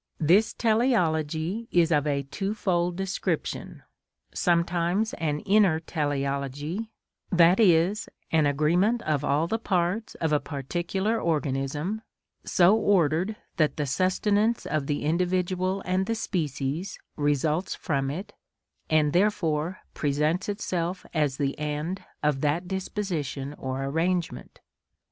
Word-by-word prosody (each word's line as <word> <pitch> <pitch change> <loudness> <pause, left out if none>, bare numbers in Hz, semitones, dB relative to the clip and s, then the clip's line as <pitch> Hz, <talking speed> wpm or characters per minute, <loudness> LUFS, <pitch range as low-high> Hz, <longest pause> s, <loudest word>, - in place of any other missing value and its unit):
This 180 +8 +4
teleology 190 - +1
is 170 -1 +3
of 150 -1 +2
a 140 -1 0
twofold 180 +1 -1
description; 190 0 -3 0.5
sometimes 175 +4 +1
an 150 -2 -1
inner 195 -5 +4
teleology, 145 - -2 0.4
that 175 +1 +5
is, 185 0 +3 0.2
an 155 -2 +4
agreement 175 - +2
of 150 -2 0
all 145 +3 +2
the 225 +6 -1
parts 190 +2 -1
of 160 -2 -1
a 150 - +4
particular 175 - -2
organism, 150 +5 -1 0.4
so 185 +3 +4
ordered 185 -2 +2 0.2
that 155 -4 +2
the 150 - 0
sustenance 205 - +1
of 150 -3 -1
the 145 - -1
individual 185 +3 0
and 185 +1 0
the 230 - 0
species 160 - -2 0.2
results 150 +4 0
from 140 -5 -1
it, 180 +9 -6 0.6
and 155 -2 +3
therefore 175 -3 +1
presents 150 +6 0
itself 180 -3 -2
as 150 -4 +1
the 140 -1 -1
end 150 +5 -3 0.2
of 150 -3 +1
that 155 +5 0
disposition 175 -8 -3
or 130 -1 -4
arrangement. 165 +5 -2
170 Hz, 115 wpm, -26 LUFS, 150-190 Hz, 0.6 s, that